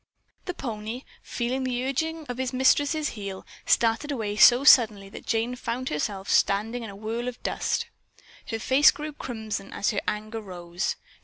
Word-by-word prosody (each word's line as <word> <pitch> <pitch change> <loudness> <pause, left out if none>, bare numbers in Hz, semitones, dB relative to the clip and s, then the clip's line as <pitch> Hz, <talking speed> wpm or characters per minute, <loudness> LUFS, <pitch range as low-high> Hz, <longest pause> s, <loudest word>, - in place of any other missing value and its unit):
The 360 - -4
pony, 225 0 -5 0.2
feeling 255 +2 -2
the 250 -1 -1
urging 320 +4 -2
of 245 -2 -6
his 260 0 -2
mistress' 290 +4 +3
heel, 200 -3 -7 0.2
started 230 +6 +2
away 215 -6 -2
so 245 +4 +7
suddenly 215 -8 +6
that - - -11
Jane 230 +2 0
found 250 +1 -3
herself 195 +6 -3
standing 220 +5 +2
in 225 - -6
a 200 - -9
whirl 225 +4 -4
of 250 -1 -6
dust. - - -1 0.6
Her 225 - -2
face 265 +6 +5
grew 300 0 -4
crimson 220 -7 -5
as 200 - 0
her - - -1
anger 215 +1 -3
rose. 175 -2 -4
235 Hz, 165 wpm, -26 LUFS, 210-260 Hz, 0.6 s, so